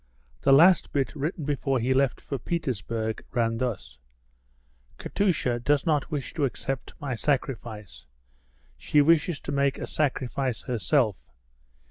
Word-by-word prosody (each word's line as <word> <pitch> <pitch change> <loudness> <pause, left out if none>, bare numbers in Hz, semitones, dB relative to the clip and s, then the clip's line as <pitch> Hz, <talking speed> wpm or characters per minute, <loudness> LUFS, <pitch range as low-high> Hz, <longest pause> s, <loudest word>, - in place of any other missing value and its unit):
The - - +3
last 170 +6 +6
bit 140 0 0
written 150 +2 -3
before 135 -2 0
he 125 +2 +1
left 135 -1 +1
for 140 - -5
Petersburg 115 - -3
ran 115 -1 0
thus: 120 - -4 1.0
"Katusha 160 -12 0
does 145 +6 +1
not 150 -4 +1
wish 145 -3 -4
to 150 -4 +1
accept 135 +1 -4
my 140 -3 -3
sacrifice; 110 - -3 0.7
she 150 - +2
wishes 160 +1 +3
to - - -5
make 140 -1 +1
a - - -4
sacrifice 130 -3 -1
herself. 120 - 0
135 Hz, 130 wpm, -26 LUFS, 120-145 Hz, 1.0 s, last